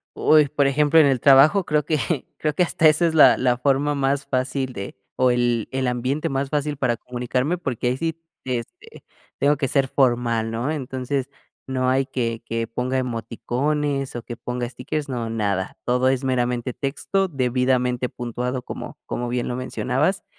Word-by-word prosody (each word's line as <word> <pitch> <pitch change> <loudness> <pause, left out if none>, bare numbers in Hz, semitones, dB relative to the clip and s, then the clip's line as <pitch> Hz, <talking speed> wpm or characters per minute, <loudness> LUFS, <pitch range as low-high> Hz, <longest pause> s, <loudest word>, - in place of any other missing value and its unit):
Uy, 155 -1 +5
por 140 0 +1
ejemplo 150 +3 +4
en 155 - +7
el 135 -3 +2
trabajo 140 - +6
creo 150 -1 +1
que, 155 -2 -1
creo 150 -1 -1
que 180 - +2
hasta 165 -2 +3
esa 155 +3 +4
es 165 - +1
la 160 - +7
la 125 -1 +2
forma 140 +3 +1
más 140 0 0
fácil 130 0 -2
de, 100 -2 -7 0.2
o 130 -1 +3
el 120 -2 +1
el 130 -1 -1
ambiente 125 +4 -1
más 135 0 -2
fácil 150 0 -1
para 125 -4 0
comunicarme 125 +7 -2
porque, 130 -8 -3
ahí 125 - -1
sí, 165 +1 -3 0.2
este, 245 - -6 0.3
tengo 145 +1 +2
que 135 -1 -1
ser 135 +1 +1
formal, 120 -4 +1
¿no? 120 +6 -2
Entonces, 130 -1 -3 0.4
no 130 -1 0
hay 135 +1 +2
que 115 -4 -2
que 115 0 -2
ponga 125 +3 -2
emoticones, 135 +4 -2
o 120 - -5
que 120 -1 -8
ponga 125 0 -4
stickers, 145 +4 -4
no, 120 -3 -3
nada. 100 -4 -2
Todo 125 +1 +2
es 130 0 0
meramente 125 -1 -1
texto, 190 - -1
debidamente 125 -3 0
puntuado 125 +1 -4
como - - -8
como 120 - -3
bien 120 0 -2
lo 120 - -2
mencionabas 130 +8 -1
130 Hz, 175 wpm, -23 LUFS, 125-145 Hz, 0.4 s, en